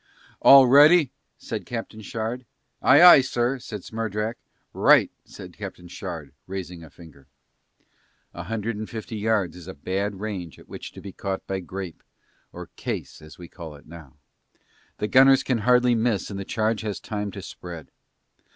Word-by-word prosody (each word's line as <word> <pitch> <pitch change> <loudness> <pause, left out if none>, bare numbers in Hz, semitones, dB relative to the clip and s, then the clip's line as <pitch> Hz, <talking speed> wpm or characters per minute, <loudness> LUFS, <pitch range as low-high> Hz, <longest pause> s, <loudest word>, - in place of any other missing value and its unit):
"All 135 -1 +9
ready?" 145 +3 +6 0.3
said - - -6
Captain 115 -2 -6
Shard. 115 +4 -4 0.4
"Aye, 145 +6 +6
aye, 175 -6 +10
sir," 130 0 -1
said 105 -5 -8
Smerdrak. 110 0 -4 0.3
"Right," - - +5
said - - -12
Captain 90 - -9
Shard 80 -5 -8
raising 90 -3 -7
a 80 - -12
finger. 75 -4 -17 1.1
A - - -7
hundred 115 0 -3
and 110 0 -6
fifty 110 0 -7
yards 105 -5 0
is 90 -1 -12
a 95 - -8
bad 95 +6 -3
range 95 -6 -6
at - - -17
which - - -9
to - - -11
be 100 - -8
caught 95 +1 -5
by 95 0 -3
grape 95 -1 -7 0.5
(or - - -10
"case" - - -5
as 75 0 -14
we 85 - -10
call 80 -4 -10
it 70 - -17
now), 80 -5 -13 0.8
the 105 - -2
gunners 135 +2 +6
can 130 -3 0
hardly 125 +2 +3
miss 115 -3 0
and 100 - -5
the 100 - -5
charge 110 0 -1
has 105 -3 -4
time 105 -1 -4
to 100 - -7
spread. 85 -4 -10
105 Hz, 170 wpm, -24 LUFS, 90-120 Hz, 1.1 s, aye